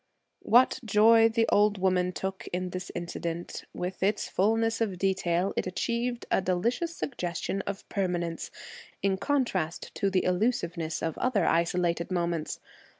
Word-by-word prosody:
What 245 +4 +4
joy 225 +1 +6
the 225 0 +1
old 210 0 +4
woman 185 -1 +2
took 190 +1 -5
in 180 0 -2
this 185 0 -5
incident! 170 0 -5
With 180 +1 -5
its 200 +2 +1
fullness 225 +3 +1
of 200 -5 0
detail, 185 -1 +1
it - - -1
achieved 235 +6 -2
a - - +3
delicious 235 - 0
suggestion 185 - -3
of 200 0 -5
permanence, 175 -4 -2 0.5
in 195 -1 +2
contrast 195 - -1
to 200 - 0
the 190 -1 +1
illusiveness 180 -5 0
of 165 - -2
other 250 -5 +2
isolated 170 0 +1
moments. 170 -3 -2
190 Hz, 140 wpm, -28 LUFS, 175-225 Hz, 0.5 s, joy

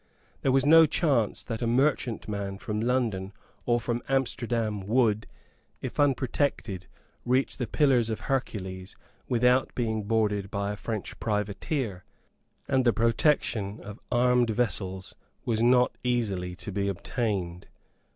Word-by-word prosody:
There 135 - +2
was 135 +1 +3
no 160 +1 +8
chance 140 - +1
that 115 0 -5
a 120 - 0
merchantman 115 -6 0
from 105 +2 -3
London 115 -6 0 0.3
or 120 0 +3
from 120 +1 -2
Amsterdam 120 -5 0
would, 110 -2 +2 0.5
if - - -6
unprotected, 130 - 0 0.4
reach 130 +2 +1
the 125 - -2
Pillars 125 -3 +3
of 110 - -3
Hercules 95 -8 -3 0.3
without 125 +1 +3
being 110 -3 -1
boarded 105 -2 0
by 100 0 -2
a - - -4
French 110 -1 -5
privateer; 105 - -2 0.6
and 130 -1 +2
the 120 -2 +4
protection 115 -3 +1
of 105 +2 -9
armed 125 -1 +3
vessels 95 -4 -2 0.3
was 115 -2 0
not 125 +1 +4
easily 100 -8 -1
to 100 - -7
be 100 +1 -1
obtained. 95 -3 -3
115 Hz, 130 wpm, -27 LUFS, 100-125 Hz, 0.6 s, no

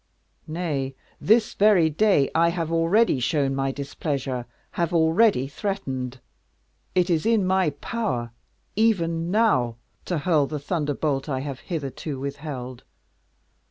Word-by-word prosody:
nay, 150 -5 -3 0.2
this 220 +2 +3
very 200 -5 +5
day 160 -3 +3
I 165 +1 +4
have 165 -1 -2
already 165 - +3
shown 135 +2 +1
my 135 0 0
displeasure 135 -3 -3 0.2
have 170 0 -1
already 160 - +4
threatened. 135 - -4 0.8
It 180 0 +2
is 160 -2 +2
in 225 -4 +2
my 185 -2 +2
power, 145 - -3 0.4
even 170 -7 +1
now, 175 - +2 0.3
to 175 - -1
hurl 150 -2 +2
the 150 - -4
thunderbolt 145 -2 -2
I 130 -2 -1
have 135 -2 -5
hitherto 145 -3 -5
withheld. 140 -3 -6
155 Hz, 125 wpm, -24 LUFS, 135-180 Hz, 0.8 s, very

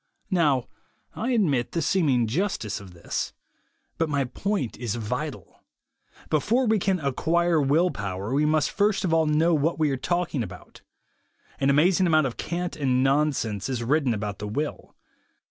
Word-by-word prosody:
Now 150 -9 +2 0.5
I 230 - -2
admit 155 - +1
the 170 - 0
seeming 145 -8 +2
justice 120 - -2
of 95 -3 -13
this. 85 - -4 0.7
But 165 -1 +1
my 140 -2 +1
point 150 - -2
is 120 -3 -3
vital. 110 -3 -5 0.7
Before 220 - +2
we 220 -2 +2
can 190 0 +1
acquire 165 +3 +1
will 155 +6 +3
power, 100 +3 -4
we 150 +2 +2
must 155 -1 +2
first 205 -1 +1
of 165 - 0
all 160 -1 +3
know 160 +3 +3
what 160 +2 +1
we 155 -2 +2
are 135 - -1
talk 175 +6 -1
ing 140 - 0
about. 115 - -9 0.8
An 135 - +2
amazing 175 +6 +4
amount 155 -3 +4
of 125 - -4
cant 175 +1 -3
and 130 -3 +1
non 145 +3 +3
sense 110 -5 -3
is 125 -3 -2
written 140 +1 +2
about 105 -1 -4
the 105 - -4
will. 145 +8 -4
150 Hz, 170 wpm, -25 LUFS, 125-170 Hz, 0.8 s, amazing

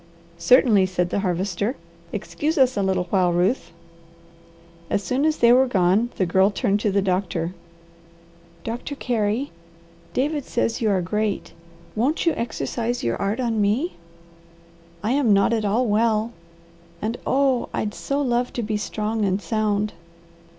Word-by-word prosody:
"Certainly," 225 -7 +5
said 180 -1 -1
the - - 0
Harvester. 195 +5 -1 0.4
"Excuse 315 +3 -2
us 260 -2 +4
a 200 - 0
little 190 -2 +1
while, 185 -3 +3
Ruth!" 180 +9 0 1.2
As 200 - 0
soon 260 +8 0
as 315 0 +2
they 235 0 +6
were 260 +1 +5
gone 195 +1 +2
the 185 - +2
Girl 190 +3 +3
turned 205 -1 0
to 210 - 0
the 200 0 +1
doctor. 180 -2 -1 1.1
"Doctor 240 +5 -5
Carey, 235 +1 -1 0.6
David 290 - 0
says 230 -1 -1
you 220 - +2
are 190 -3 +1
great. 210 +3 -2 0.4
Won't 270 +11 0
you 335 - +3
exercise 235 +1 -3
your 115 - 0
art 200 +5 -1
on 230 -4 0
me. 225 - +1 1.1
I 215 - 0
am 265 -6 +3
not 200 +3 +3
at 220 -2 0
all 220 +5 +2
well, 220 +1 +1 0.7
and 220 +5 -3
oh! 265 -2 +2
I'd 210 -1 -2
so 280 +1 -2
love 245 -1 0
to 240 - -2
be 215 0 -1
strong 215 +1 -2
and 195 -1 +1
sound." 210 -1 -1
215 Hz, 150 wpm, -23 LUFS, 200-245 Hz, 1.2 s, they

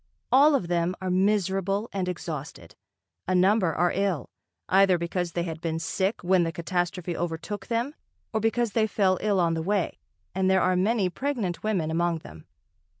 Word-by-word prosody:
All 285 +3 +6
of 185 -11 -1
them 175 +1 0
are 185 -1 -2
miserable 195 +1 +1
and 185 -2 -1
exhausted, 150 - -6 0.5
a 185 - +1
number 185 0 +3
are 175 +2 +1
ill, 190 -8 -1 0.4
either 190 -1 +5
because 170 0 -3
they 170 - -1
had 165 -2 -5
been 160 -1 -2
sick 190 +5 -1
when 185 0 +3
the 165 - -1
catastrophe 175 0 -2
overtook 175 +4 -4
them 235 +5 -1 0.4
or 220 - +1
because 225 +1 +1
they 220 +1 +2
fell 190 -3 +1
ill 205 -2 +1
on 170 -2 +2
the 165 - -1
way, 195 +1 -1 0.3
and 190 0 +1
there 190 0 +4
are 185 0 +2
many 200 +2 +2
pregnant 235 -8 -2
women 185 -8 -1
among 170 +1 +1
them. 80 0 -12
185 Hz, 175 wpm, -26 LUFS, 170-205 Hz, 0.5 s, All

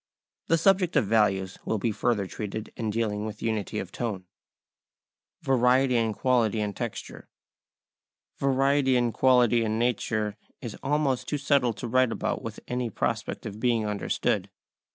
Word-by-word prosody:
The 165 - +3
subject 180 0 +3
of 140 -7 +4
values 100 -3 +1
will 110 - -1
be 110 +3 0
further 110 -2 0
treated 105 +2 -6
in 115 -2 -3
dealing 105 -1 -1
with 110 0 -6
unity 110 -3 -2
of 95 - -4
tone. 105 -6 -4 1.2
[Sidenote: 135 -2 +2
Variety 125 +1 +4
in 115 -2 +1
Quality 120 -4 +2
and 105 -1 -2
Texture] 120 -3 -6 1.1
Variety 135 0 +2
in 120 -1 +2
quality 120 -2 +4
and 110 0 -1
nature 110 -3 -1 0.2
is 120 -4 -6
almost 140 -3 0
too 150 - 0
subtle 140 -4 +2
to 115 +3 -6
write 130 0 +3
about - - -2
with - - -7
any 125 -1 -2
prospect - - -3
of 105 0 -6
being 115 -2 +1
understood. 105 0 -1
115 Hz, 155 wpm, -27 LUFS, 105-130 Hz, 1.2 s, of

